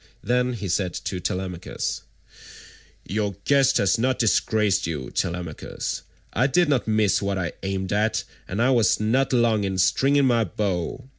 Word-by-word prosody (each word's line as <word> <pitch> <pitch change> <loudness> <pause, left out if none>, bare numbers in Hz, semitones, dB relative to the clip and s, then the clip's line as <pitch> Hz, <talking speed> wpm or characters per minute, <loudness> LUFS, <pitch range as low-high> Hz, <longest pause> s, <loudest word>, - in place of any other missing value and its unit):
Then 125 +2 +1
he 105 -4 -5
said 90 0 -1
to 95 - -4
Telemachus: 90 -1 -3 1.0
"Your 105 -1 -2
guest 140 -1 +4
has 100 +2 +2
not 130 +2 +1
disgraced 105 -4 +2
you, 75 -6 -4
Telemachus. 85 -2 -3 0.3
I 125 +5 +2
did 165 +5 +3
not 135 -6 +1
miss 110 -3 +2
what 100 -1 -1
I 90 -2 -2
aimed 95 0 -2
at, 105 +2 +1 0.2
and 100 +5 -1
I 130 - +3
was 120 -4 +3
not 120 +6 +1
long 120 -4 +2
in 95 -1 -2
stringing 135 +10 +3
my 120 -3 +3
bow. 100 +5 -3
105 Hz, 155 wpm, -24 LUFS, 95-125 Hz, 1.0 s, guest